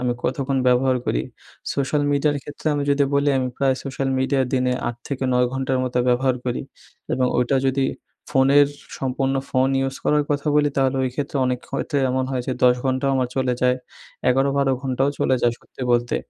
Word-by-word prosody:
আমি 125 Hz, -1 st, 0 dB
কতক্ষণ 135 Hz, +1 st, -1 dB
ব্যবহার 125 Hz, +1 st, +3 dB
করি -, -, 0 dB, 0.5 s
সোশ্যাল 145 Hz, +1 st, 0 dB
মিডিয়ার 145 Hz, +1 st, +2 dB
ক্ষেত্রে 145 Hz, +2 st, -10 dB
আমি 145 Hz, -, -1 dB
যদি 140 Hz, 0 st, +3 dB
বলি 140 Hz, 0 st, +3 dB
আমি 130 Hz, -1 st, -1 dB
প্রায় 135 Hz, -1 st, +2 dB
সোশ্যাল 135 Hz, 0 st, -2 dB
মিডিয়া 135 Hz, +1 st, +1 dB
দিনে 125 Hz, -1 st, +2 dB, 0.2 s
৮ 120 Hz, -, -5 dB
থেকে 135 Hz, -2 st, -3 dB
৯ 125 Hz, 0 st, +3 dB
ঘন্টার 130 Hz, 0 st, -1 dB
মতো 125 Hz, 0 st, -1 dB
ব্যবহার 130 Hz, +1 st, +2 dB
করি 125 Hz, -1 st, -2 dB, 0.5 s
এবং 130 Hz, -1 st, +2 dB
ওইটা 125 Hz, +2 st, +2 dB
যদি 135 Hz, 0 st, +1 dB, 0.5 s
ফোনের 140 Hz, +2 st, +5 dB, 0.3 s
সম্পূর্ণ 135 Hz, +1 st, -1 dB, 0.2 s
ফোন 130 Hz, 0 st, +2 dB
ইউজ 135 Hz, 0 st, -2 dB
করার 150 Hz, 0 st, +3 dB
কথা 145 Hz, +1 st, -1 dB
বলি, 150 Hz, 0 st, +4 dB
তাহলে 135 Hz, 0 st, +2 dB
ওই 130 Hz, -, 0 dB
ক্ষেত্রে 145 Hz, 0 st, -3 dB
অনেক 125 Hz, -1 st, 0 dB
ক্ষেত্রে 140 Hz, +1 st, -1 dB
এমন 130 Hz, 0 st, 0 dB
হয় 130 Hz, -2 st, -1 dB
যে 130 Hz, -, 0 dB
১০ 125 Hz, 0 st, +6 dB
ঘণ্টাও 130 Hz, +1 st, +1 dB
আমার 130 Hz, -1 st, 0 dB
চলে 130 Hz, -1 st, +1 dB
যায় 125 Hz, 0 st, +3 dB, 0.5 s
১১-১২ 135 Hz, +1 st, +2 dB
ঘণ্টাও 135 Hz, +1 st, 0 dB
চলে 130 Hz, -, +2 dB
যায় 120 Hz, -1 st, +3 dB
সত্যি 130 Hz, -, -11 dB
বলতে 120 Hz, 0 st, +1 dB
130 Hz, 190 wpm, -22 LUFS, 125-140 Hz, 0.5 s, ১০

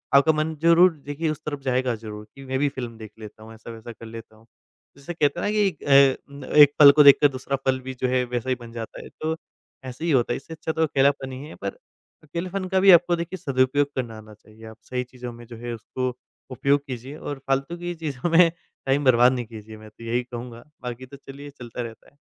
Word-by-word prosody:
आपका 140 Hz, +3 st, +6 dB
मन 155 Hz, +1 st, -1 dB
ज़रूर 170 Hz, +2 st, +6 dB
देखिए 145 Hz, +3 st, -2 dB
उस 155 Hz, -, -4 dB
तरफ 145 Hz, -2 st, -4 dB
जाएगा 130 Hz, -2 st, 0 dB
ज़रूर 105 Hz, -1 st, -9 dB
कि 135 Hz, 0 st, -11 dB
मैं 130 Hz, 0 st, -2 dB
भी 145 Hz, -, +2 dB
फ़िल्म 120 Hz, -4 st, -7 dB
देख 110 Hz, -1 st, -10 dB
लेता 110 Hz, 0 st, -11 dB
हूँ, 110 Hz, +1 st, -12 dB
ऐसा-वैसा 115 Hz, +1 st, -10 dB
कर 115 Hz, 0 st, -12 dB
लेता 115 Hz, -1 st, -10 dB
हूँ। 110 Hz, +1 st, -22 dB, 0.5 s
जैसे 140 Hz, +5 st, -7 dB
कहते 150 Hz, 0 st, +1 dB
हैं 175 Hz, -, -1 dB
ना -, -, 0 dB
कि 210 Hz, -2 st, +3 dB, 0.2 s
अ 140 Hz, 0 st, +3 dB
अ, -, -, -2 dB
एक 145 Hz, -1 st, +9 dB
पल 145 Hz, -2 st, +11 dB
को 150 Hz, +1 st, +6 dB
देखकर 140 Hz, +1 st, +8 dB
दूसरा 135 Hz, +1 st, -3 dB
फल 130 Hz, 0 st, +2 dB
भी 130 Hz, +1 st, -6 dB
जो 130 Hz, 0 st, -2 dB
है, 125 Hz, 0 st, +1 dB
वैसा 125 Hz, +1 st, -3 dB
ही 130 Hz, -, +2 dB
बन 115 Hz, -1 st, -11 dB
जाता 115 Hz, -1 st, -7 dB
है -, -, -11 dB
तो 160 Hz, +1 st, -1 dB, 0.5 s
ऐसे 130 Hz, +5 st, -6 dB
ही 170 Hz, -, +1 dB
होता 120 Hz, -3 st, +2 dB
है। -, -, -2 dB
इससे 155 Hz, +4 st, -10 dB
अच्छा 160 Hz, 0 st, -4 dB
तो 160 Hz, 0 st, 0 dB
अकेलापन 135 Hz, -2 st, +1 dB
ही 130 Hz, +1 st, -7 dB
है 155 Hz, -, -11 dB
पर -, -, -4 dB, 0.5 s
अकेलेपन 180 Hz, +5 st, -4 dB
का 190 Hz, 0 st, +1 dB
भी 195 Hz, +1 st, +7 dB
आपको 175 Hz, 0 st, +6 dB
देखिए 170 Hz, +2 st, -5 dB
सदुपयोग 135 Hz, -1 st, +1 dB
करना 120 Hz, -4 st, -4 dB
आना 110 Hz, 0 st, -13 dB
चाहिए। 110 Hz, +1 st, -17 dB
आप 110 Hz, 0 st, -12 dB
सही 125 Hz, 0 st, -1 dB
चीज़ों 125 Hz, -1 st, -9 dB
में 120 Hz, 0 st, -12 dB
जो 120 Hz, -, -10 dB
है 120 Hz, +1 st, -5 dB
उसको, 125 Hz, +3 st, -4 dB, 0.3 s
उपयोग 140 Hz, +3 st, +1 dB
कीजिए 130 Hz, +3 st, -7 dB
और 145 Hz, -3 st, -6 dB
फालतू 135 Hz, +5 st, -1 dB
की 175 Hz, 0 st, -4 dB
चीज़ों 155 Hz, -1 st, -3 dB
में 170 Hz, 0 st, +7 dB, 0.4 s
टाइम 135 Hz, +2 st, +1 dB
बर्बाद 125 Hz, -1 st, +6 dB
नहीं 120 Hz, -2 st, -3 dB
कीजिए 110 Hz, -1 st, -11 dB
मैं 110 Hz, 0 st, -13 dB
तो 110 Hz, -, -16 dB
यही 120 Hz, +2 st, -1 dB
कहूँगा। 120 Hz, -1 st, -9 dB, 0.2 s
बाकी 125 Hz, +1 st, -6 dB
तो 140 Hz, +2 st, -13 dB
चलिए 140 Hz, +1 st, -11 dB
चलता 120 Hz, 0 st, -6 dB
रहता। 115 Hz, +4 st, -10 dB
130 Hz, 235 wpm, -24 LUFS, 120-150 Hz, 0.5 s, पल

